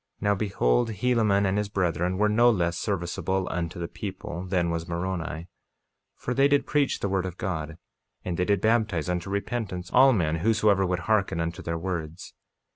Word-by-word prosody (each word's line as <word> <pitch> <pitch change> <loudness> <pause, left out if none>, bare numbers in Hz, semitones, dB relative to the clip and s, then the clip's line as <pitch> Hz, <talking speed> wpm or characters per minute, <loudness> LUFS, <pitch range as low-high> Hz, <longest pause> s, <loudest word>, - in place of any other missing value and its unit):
48:19 - - -35
Now 105 0 +3
behold, 100 - +1
Helaman 110 -2 +2
and 95 +2 +1
his 105 -1 -2
brethren 90 -2 0
were 105 +2 +3
no 115 +3 +5
less 85 -6 +1
serviceable 95 0 -2
unto 85 -1 -3
the 85 - -3
people 85 +2 -6
than 90 -2 +1
was 85 0 -3
Moroni; 85 -3 -3 0.7
for 125 - -3
they 135 +2 +4
did 145 0 +2
preach 145 -2 +1
the - - 0
word 95 -1 0
of 90 -1 -8
God, 80 -3 -4 0.5
and 90 - -2
they 90 - 0
did 100 -1 +1
baptize 110 -7 +1
unto 90 +1 -2
repentance 100 -3 -3
all 135 +2 +7
men 80 -8 +1
whosoever 105 0 +2
would 90 0 -1
hearken 105 -6 +1
unto 85 0 -3
their 85 0 -3
words. 85 -1 -5
95 Hz, 185 wpm, -26 LUFS, 85-105 Hz, 0.7 s, all